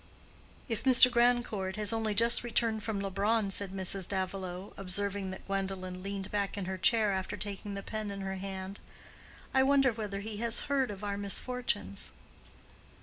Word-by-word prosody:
"If 225 -4 -3
Mr. 255 -1 +7
Grandcourt 235 -6 +1
has 210 +1 +1
only 220 -2 -1
just 230 +3 +4
returned 230 -2 0
from 210 -1 -3
Leubronn," 200 +2 0
said 200 0 0
Mrs. 190 -1 +2
Davilow, 190 -1 -4
observing 195 +1 0
that 190 - -8
Gwendolen 190 -2 -3
leaned 195 0 -5
back 205 -1 -2
in 200 - -3
her 190 0 -4
chair 220 +1 +4
after 190 -1 -3
taking 205 0 -5
the 195 - -6
pen 215 -1 -4
in 200 0 -6
her 190 0 -4
hand—"I 195 +6 -6
wonder 270 -2 +4
whether 210 -3 -4
he 215 0 -6
has 230 +1 +4
heard 275 -3 0
of 205 0 -7
our 200 -1 -2
misfortunes?" 205 - 0
200 Hz, 160 wpm, -31 LUFS, 190-225 Hz, -, Mr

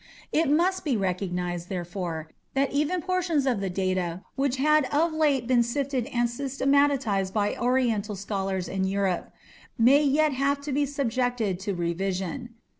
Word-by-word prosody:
It 320 -2 +2
must 350 +6 +2
be 275 -7 +1
recognized, 180 -2 -2
therefore, 175 -3 -4 0.2
that 275 0 +2
even 300 +5 0
portions 355 -6 0
of 250 -6 +1
the 195 - -1
data 185 -1 -1
which 270 -1 0
had 305 +1 +4
of 315 +5 +1
late 290 -6 +2
been 250 0 +3
sifted 260 +1 -1
and 240 -3 +1
systematized 270 -5 +1
by 205 -1 +1
Oriental 240 -4 0
scholars 195 -2 -3
in 190 0 -2
Europe, 190 -2 -1 0.5
may 260 +5 +6
yet 295 +1 +3
have 275 +2 +1
to 285 +1 -5
be 285 +1 +1
subjected 245 -7 -1
to 195 0 -3
revision. 190 +7 -3
240 Hz, 150 wpm, -26 LUFS, 190-280 Hz, 0.5 s, may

